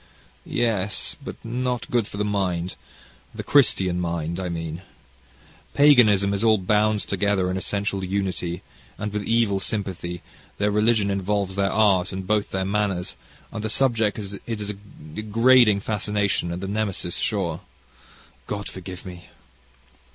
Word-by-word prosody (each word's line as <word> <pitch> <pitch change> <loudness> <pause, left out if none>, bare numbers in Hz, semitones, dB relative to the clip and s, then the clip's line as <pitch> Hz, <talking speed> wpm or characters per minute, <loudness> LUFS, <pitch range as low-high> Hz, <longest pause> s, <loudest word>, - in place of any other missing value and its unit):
"Yes, 105 -4 -1
but - - -6
not 125 +1 -2
good 120 -4 +2
for - - -8
the 105 - 0
mind 95 -3 -1 0.6
the - - -5
Christian 95 -10 +4
mind, 85 0 -2
I 90 -1 -3
mean. 80 0 -4 0.9
Paganism 110 -9 +6
is 100 +2 -1
all 110 -1 +5
bound 105 +2 +2
together 95 -1 0
in - - -2
essential 100 +1 -2
unity, 95 -2 -2 0.3
and, 105 0 -4
with 105 -1 -2
evil 115 -3 +2
sympathy, 90 -4 -3 0.3
their 105 0 +1
religion 105 -1 +2
involves 100 0 -1
their 100 -1 +1
art, 100 -4 +3
and 95 -1 -5
both 105 +1 +1
their 95 0 -2
manners, 100 -6 -1 0.4
and 110 - -5
the 110 - -1
subject 115 -4 +1
is 100 -2 -6
a 105 -3 -3 0.4
degrading 110 0 +4
fascination 105 -4 0
and 90 +2 -5
the - - -3
Nemesis 100 -3 -2
sure. 90 -7 -1 0.9
God 100 -1 -4
forgive 95 -1 -8
me! 90 -1 -9
100 Hz, 140 wpm, -24 LUFS, 95-110 Hz, 0.9 s, Paganism